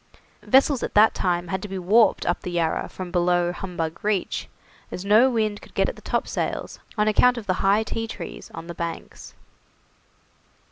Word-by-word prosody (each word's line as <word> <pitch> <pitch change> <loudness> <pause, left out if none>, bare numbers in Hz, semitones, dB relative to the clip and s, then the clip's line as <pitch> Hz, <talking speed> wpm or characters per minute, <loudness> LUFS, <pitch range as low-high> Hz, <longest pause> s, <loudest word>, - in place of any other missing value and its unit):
Vessels 270 0 +3
at - - -4
that 215 +1 +6
time 175 -2 -1
had 190 +1 -2
to 210 - -5
be 195 -1 -5
warped 210 +5 +3
up 175 - 0
the - - -5
Yarra 170 -2 -1
from 185 -2 -7
below 175 0 +2
Humbug 175 -3 -5
Reach, 205 -3 -1 0.4
as 180 - -6
no 220 +6 +6
wind 215 -4 -1
could - - -17
get - - +2
at - - -7
the - - -14
topsails, - - -3 0.2
on 210 0 +2
account 250 +4 +4
of 230 - -6
the 185 - +1
high 200 +3 +3
tea 225 +1 -4
tree 190 -6 -7
on 165 - -8
the 170 - -7
banks. 170 0 -7
195 Hz, 185 wpm, -24 LUFS, 175-215 Hz, 0.4 s, that